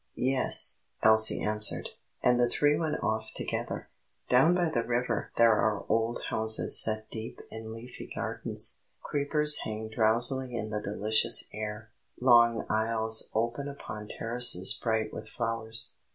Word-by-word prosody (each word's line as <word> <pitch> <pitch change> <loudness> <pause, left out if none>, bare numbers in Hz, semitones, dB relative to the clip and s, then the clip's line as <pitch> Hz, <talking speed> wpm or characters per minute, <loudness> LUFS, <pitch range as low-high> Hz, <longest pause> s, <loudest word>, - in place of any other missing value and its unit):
"Yes," 130 +1 +4 0.2
Elsie 110 0 +5
answered; 105 0 -1 0.3
and 125 0 +1
the 120 0 +1
three 145 +4 0
went 155 -1 -5
off 110 0 -4
together. - - -6 0.4
Down 135 +8 +2
by 175 -3 -2
the 120 - -2
river 120 -2 -4
there 115 -1 +4
are 105 -1 -2
old 115 +2 -3
houses 110 0 +5
set 110 0 0
deep 110 0 -9
in 110 0 -10
leafy 115 +2 -12
gardens; - - -2 0.2
creepers 150 +1 +2
hang 110 0 -7
drowsily 120 +3 +1
in 110 -2 -6
the 105 0 -5
delicious 105 +2 +1
air; 105 +1 -8 0.3
long 120 -2 +2
aisles 110 0 +1
open 120 +5 -4
upon 110 -7 -10
terraces 115 -6 +2
bright 110 -2 -4
with 110 0 -10
flowers. 115 0 -2
115 Hz, 140 wpm, -26 LUFS, 110-125 Hz, 0.4 s, Elsie